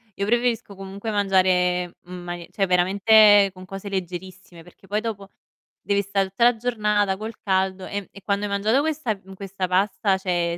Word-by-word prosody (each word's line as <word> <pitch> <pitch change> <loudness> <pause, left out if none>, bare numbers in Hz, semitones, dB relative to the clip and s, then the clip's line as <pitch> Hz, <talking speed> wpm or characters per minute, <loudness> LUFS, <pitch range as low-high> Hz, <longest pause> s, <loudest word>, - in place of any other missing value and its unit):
io 200 - -2
preferisco 235 -2 0
comunque 195 +3 -7
mangiare, 185 -3 +1
mhmm, 180 - -12
manie 175 -1 -7
cioè 195 - 0
veramente 200 +3 +5
con 185 0 -12
cose 195 +1 -7
leggerissime, 185 -1 -6
perché 180 +3 -19
poi 210 +2 0
dopo 200 -4 -5 0.5
devi 200 0 +1
sta 195 0 0
tutta 195 +5 -2
la 240 0 +5
giornata 210 -4 0
col 220 +2 -6
caldo, 190 -1 0
ehm, 200 -1 -5
e 200 - -13
quando 200 0 -1
hai 200 - -4
mangiato 215 +7 +2
questa 300 -8 -1
mhmm, 195 0 -15
questa 190 -1 -5
pasta, 195 +1 +1
cioè 175 -2 -1
195 Hz, 175 wpm, -23 LUFS, 185-210 Hz, 0.5 s, veramente